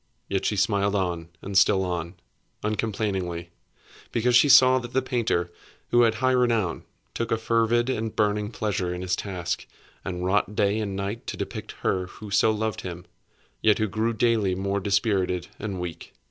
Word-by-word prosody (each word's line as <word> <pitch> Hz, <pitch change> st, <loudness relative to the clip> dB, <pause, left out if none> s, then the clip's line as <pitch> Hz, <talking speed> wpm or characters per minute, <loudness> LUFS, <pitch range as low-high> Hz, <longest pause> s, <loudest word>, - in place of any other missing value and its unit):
Yet 95 Hz, -1 st, -1 dB
she 105 Hz, -, +1 dB
smiled 100 Hz, 0 st, +1 dB
on 85 Hz, -4 st, -1 dB
and 100 Hz, 0 st, -6 dB
still 95 Hz, 0 st, +4 dB
on, 85 Hz, 0 st, -3 dB, 0.5 s
uncomplainingly, 100 Hz, -5 st, -2 dB, 0.6 s
because 120 Hz, +1 st, +2 dB
she 135 Hz, +4 st, +6 dB
saw 130 Hz, -1 st, +7 dB
that 120 Hz, -1 st, -8 dB
the 130 Hz, -, +3 dB
painter 110 Hz, -9 st, 0 dB, 0.4 s
(who 120 Hz, -, +5 dB
had 115 Hz, -2 st, +4 dB
high 130 Hz, +3 st, +2 dB
renown) 115 Hz, -8 st, +1 dB, 0.3 s
took 115 Hz, -1 st, -3 dB
a 115 Hz, -, +3 dB
fervid 115 Hz, +1 st, +2 dB
and 115 Hz, -4 st, -2 dB
burning 105 Hz, 0 st, +1 dB
pleasure 105 Hz, -5 st, -2 dB
in 90 Hz, -, -5 dB
his 90 Hz, -1 st, 0 dB
task, 90 Hz, -4 st, -4 dB, 0.4 s
and 90 Hz, -1 st, -4 dB
wrought 105 Hz, +2 st, +1 dB
day 105 Hz, 0 st, +2 dB
and 100 Hz, -3 st, -3 dB
night 100 Hz, +4 st, -4 dB
to -, -, -4 dB
depict -, -, -5 dB
her 90 Hz, -1 st, 0 dB
who 105 Hz, +2 st, -11 dB
so 105 Hz, -, +4 dB
loved 110 Hz, -1 st, -1 dB
him, 90 Hz, -1 st, -7 dB, 0.6 s
yet 105 Hz, -2 st, +4 dB
who 110 Hz, -, +1 dB
grew 110 Hz, +4 st, 0 dB
daily 110 Hz, -4 st, +2 dB
more 100 Hz, +1 st, -1 dB
dispirited 95 Hz, -3 st, 0 dB
and 100 Hz, -3 st, -4 dB
weak. 90 Hz, -2 st, -7 dB
105 Hz, 175 wpm, -25 LUFS, 95-115 Hz, 0.6 s, saw